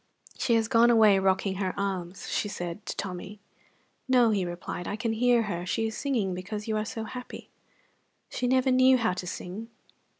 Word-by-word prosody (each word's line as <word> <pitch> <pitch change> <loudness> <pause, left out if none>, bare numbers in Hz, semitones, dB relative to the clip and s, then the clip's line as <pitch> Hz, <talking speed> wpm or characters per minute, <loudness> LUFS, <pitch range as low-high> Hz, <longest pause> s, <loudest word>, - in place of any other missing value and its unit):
"She 245 -3 +1
has 225 -1 +2
gone 230 +1 +5
away 215 -4 +6
rocking 190 0 +1
her 190 0 -2
arms," 190 -2 -3
she - - -1
said 175 0 -6
to - - -4
Tommy. 195 +2 -6 0.7
"No," 250 -3 +4
he 200 -3 +1
replied. 175 0 -6
"I - - -2
can 225 +1 -2
hear 240 +1 +3
her. 175 -5 -3
She 225 +5 -1
is 220 -1 -3
singing 230 -10 -1
because 205 +4 -6
you 220 - 0
are 215 0 -1
so 225 -1 -5
happy." 250 +3 -8 0.8
"She 250 - -2
never 260 +1 +3
knew 255 0 +6
how 225 -5 +1
to 180 0 -6
sing." 190 +5 -6
215 Hz, 190 wpm, -28 LUFS, 190-235 Hz, 0.8 s, away